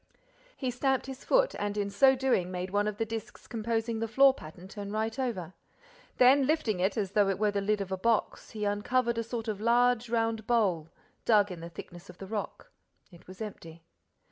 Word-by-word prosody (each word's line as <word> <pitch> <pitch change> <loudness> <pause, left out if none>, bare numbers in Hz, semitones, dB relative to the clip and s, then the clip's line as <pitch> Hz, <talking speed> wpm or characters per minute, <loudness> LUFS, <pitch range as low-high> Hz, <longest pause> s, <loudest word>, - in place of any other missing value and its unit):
He 255 -3 -2
stamped 265 +2 0
his 265 0 -8
foot, - - +3
and, 205 0 -2
in 200 -1 -1
so 265 +6 +5
doing, 255 -9 +1
made 185 0 -4
one 205 +1 +1
of 210 -1 -3
the 225 - 0
discs 225 -1 -7
composing 225 0 -2
the 225 - -1
floor 270 +4 +6
pattern 175 - -11
turn 200 0 -7
right 220 +3 -2
over. 190 -9 -3 0.6
Then, 260 +2 +6
lifting 270 - +1
it 190 +5 0
as 200 -3 -1
though 205 -1 +3
it 195 - 0
were 210 0 +2
the 200 0 -1
lid 210 +1 0
of 190 -1 -5
a 190 - -1
box, 225 +3 0
he 210 -1 -4
uncovered 235 +4 0
a - - -1
sort 230 0 -5
of 210 -2 -3
large 240 0 +3
round 225 -2 -1
bowl, 190 -10 +1 0.3
dug 210 -3 +4
in 175 - -7
the 170 +1 -8
thickness 175 0 -11
of - - -12
the 195 - -8
rock. 210 +1 -5 0.4
It 175 -1 -17
was 185 +4 -7
empty. 165 -6 -10
215 Hz, 210 wpm, -29 LUFS, 195-235 Hz, 0.6 s, floor